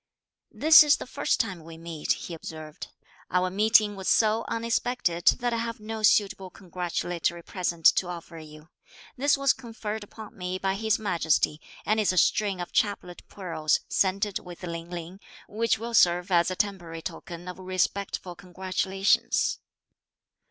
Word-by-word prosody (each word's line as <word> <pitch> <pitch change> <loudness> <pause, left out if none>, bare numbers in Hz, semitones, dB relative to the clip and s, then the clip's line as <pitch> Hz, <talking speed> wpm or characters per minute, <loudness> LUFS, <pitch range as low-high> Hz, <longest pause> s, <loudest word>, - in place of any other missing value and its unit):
"This 315 +1 +7
is 295 -1 +4
the - - -7
first 280 +3 -1
time 190 -8 -2
we 165 0 -11
meet," 165 -2 -2
he 175 - -8
observed. 155 -1 -8 0.4
"Our 185 0 +1
meeting 210 +1 +4
was 190 -1 -6
so 220 +1 +3
unexpected 230 -6 -1
that 245 -1 0
I - - 0
have 230 +1 -4
no 220 +1 -6
suitable 200 -3 +2
congratulatory 175 -2 -3
present 170 -3 -4
to 185 - +1
offer 170 -1 -8
you. 155 +1 -13 0.5
This 285 +2 +2
was 275 -1 +3
conferred 220 -3 -6
upon 215 +1 -12
me 180 0 -4
by 190 0 -1
His 220 +2 +1
Majesty, 160 -6 0 0.2
and 215 +1 +2
is 210 - +2
a 185 - -4
string 200 +1 +2
of 175 - -5
chaplet 190 -4 -1
pearls, 165 -5 -1
scented 195 +1 0
with 180 0 -12
Ling 170 -1 -6
Ling, 175 +2 -7 0.3
which 230 +2 0
will 235 +1 -6
serve 175 -3 +4
as 170 +1 +4
a 185 - -3
temporary 175 -5 -3
token 175 +1 -8
of 180 +1 -7
respectful 185 0 -2
congratulations." 190 +2 0
185 Hz, 155 wpm, -27 LUFS, 175-215 Hz, 0.5 s, This